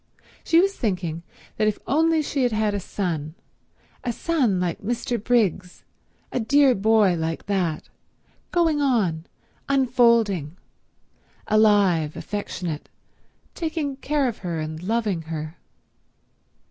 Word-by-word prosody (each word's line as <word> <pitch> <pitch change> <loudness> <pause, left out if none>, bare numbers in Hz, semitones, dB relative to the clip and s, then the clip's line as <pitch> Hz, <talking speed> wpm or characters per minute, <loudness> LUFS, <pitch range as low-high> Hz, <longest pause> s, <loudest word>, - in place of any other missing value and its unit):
She 330 - +4
was 390 +2 +2
thinking 180 -7 -2 0.4
that 215 - +2
if 215 - 0
only 320 +1 +2
she 280 -1 -2
had 245 -1 +2
had 215 -1 0
a 205 - -1
son—a 170 +5 -6
son 250 - 0
like 175 -2 -2
Mr. 235 0 -2
Briggs, 200 -7 0 0.5
a - - -1
dear 275 +3 +4
boy 210 -2 +3
like 160 0 -3
that, 180 -6 -1 0.6
going 325 -4 +2
on, 195 - +1 0.4
unfolding, 235 - +2 0.9
alive, 200 -8 +3
affectionate, 180 -6 -5 0.6
taking 315 -4 -3
care 285 -1 0
of 235 - -4
her 170 -3 -3
and 155 +1 -5
loving 210 -3 -1
her. 160 0 -6
210 Hz, 115 wpm, -24 LUFS, 175-255 Hz, 0.9 s, She